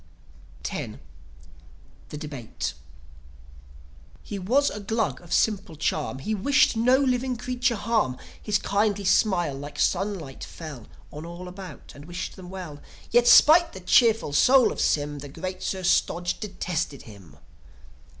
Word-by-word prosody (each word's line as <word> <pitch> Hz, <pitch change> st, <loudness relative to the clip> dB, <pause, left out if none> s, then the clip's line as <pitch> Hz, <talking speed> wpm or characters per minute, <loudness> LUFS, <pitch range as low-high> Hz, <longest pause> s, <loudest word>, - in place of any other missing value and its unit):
X. -, -, -5 dB, 1.1 s
THE 150 Hz, -, -7 dB
DEBATE 145 Hz, -7 st, -5 dB, 1.5 s
He 200 Hz, -, -6 dB
was 260 Hz, +10 st, +2 dB
a -, -, -6 dB
Glug 205 Hz, -, -2 dB
of 175 Hz, -1 st, -15 dB
simple 195 Hz, -6 st, +1 dB
charm; 150 Hz, -2 st, -2 dB
He 210 Hz, +11 st, -3 dB
wished 250 Hz, +5 st, +3 dB
no 245 Hz, +3 st, +4 dB
living 255 Hz, -2 st, 0 dB
creature 250 Hz, 0 st, -1 dB
harm. 210 Hz, -, 0 dB, 0.2 s
His 210 Hz, -1 st, +1 dB
kindly 205 Hz, 0 st, 0 dB
smile 175 Hz, -7 st, +2 dB
like 145 Hz, +2 st, -8 dB
sunlight 185 Hz, -10 st, -1 dB
fell 150 Hz, -9 st, -9 dB, 0.3 s
On 150 Hz, -, -7 dB
all 170 Hz, +2 st, -8 dB
about, 180 Hz, -4 st, -10 dB
and 145 Hz, +1 st, -12 dB
wished 175 Hz, +2 st, -6 dB
them 185 Hz, -2 st, -11 dB
well. 180 Hz, -6 st, -8 dB, 0.3 s
Yet, 240 Hz, +1 st, +4 dB
'spite 320 Hz, +7 st, +7 dB
the 190 Hz, -, -8 dB
cheerful 225 Hz, -, +3 dB
soul 255 Hz, -, +5 dB
of -, -, -4 dB
Sym, 145 Hz, -1 st, 0 dB
The 145 Hz, 0 st, -9 dB
great 185 Hz, +5 st, -6 dB
Sir 190 Hz, -1 st, -3 dB
Stodge 175 Hz, 0 st, +1 dB
detested 180 Hz, -8 st, -4 dB
him. 95 Hz, -, -14 dB
185 Hz, 140 wpm, -25 LUFS, 150-225 Hz, 1.5 s, spite